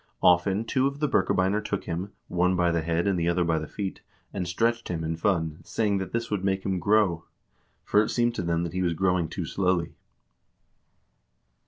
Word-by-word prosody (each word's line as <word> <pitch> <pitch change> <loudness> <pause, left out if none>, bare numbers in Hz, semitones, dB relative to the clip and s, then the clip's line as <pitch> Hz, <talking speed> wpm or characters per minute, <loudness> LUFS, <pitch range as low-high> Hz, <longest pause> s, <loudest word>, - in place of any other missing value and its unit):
Often 95 +4 +4
two 130 +3 +2
of 140 +1 -5
the 150 - +1
Birkebeiner 100 -3 +1
took 100 -2 -3
him, 90 +4 -4 0.2
one 90 +1 +1
by 90 -1 +2
the 85 -1 0
head 85 +1 0
and 95 -3 +1
the 85 0 +1
other 85 +1 +2
by 80 -1 +1
the 80 - -6
feet, 95 +4 -5 0.3
and 95 -3 -3
stretched 115 +6 0
him 85 -2 -3
in 80 +1 -2
fun, 80 -3 0
saying 105 -3 0
that 95 - -5
this 115 -1 -3
would 100 -3 -1
make 95 0 0
him 95 -2 0
grow; 95 -3 +2 0.6
for 105 - +4
it 105 - -1
seemed 120 -1 +1
to - - -3
them 85 -1 0
that 85 -1 -4
he 95 - -1
was 85 -2 0
growing 90 -1 +1
too 90 0 -4
slowly." 90 -1 0
90 Hz, 205 wpm, -26 LUFS, 85-105 Hz, 0.6 s, Often